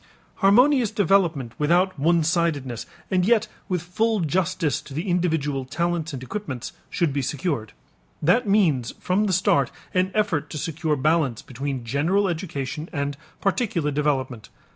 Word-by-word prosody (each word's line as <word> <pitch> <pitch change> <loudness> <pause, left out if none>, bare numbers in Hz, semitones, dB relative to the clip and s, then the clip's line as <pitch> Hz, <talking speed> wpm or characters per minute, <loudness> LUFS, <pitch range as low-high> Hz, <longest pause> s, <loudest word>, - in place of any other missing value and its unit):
Harmonious 245 +4 +5
development 170 - +1
without 175 +3 +2
one 165 +3 +3
sidedness, 150 -7 -1 0.2
and 185 -1 +3
yet 225 +2 +3 0.2
with 180 -3 -1
full 215 +5 0
justice 170 -2 0
to 135 - -11
the 165 +7 -3
individual 160 -6 0
talents 170 +4 -2
and 130 -3 -6
equipments, 135 - -5 0.2
should 165 -5 0
be 140 - 0
secured. 135 - -2 0.5
That 205 +10 +3
means 160 - +2
from 195 +4 +1
the 200 - 0
start 180 -6 +3 0.2
an 185 0 +2
effort 180 -9 0
to - - -5
secure 160 0 -1
balance 150 -4 +1
between 130 -1 -4
general 165 - +1
education 155 -3 -4
and 140 -2 -2 0.3
particular 195 - 0
development. 135 -6 -1
165 Hz, 140 wpm, -24 LUFS, 140-185 Hz, 0.5 s, Harmonious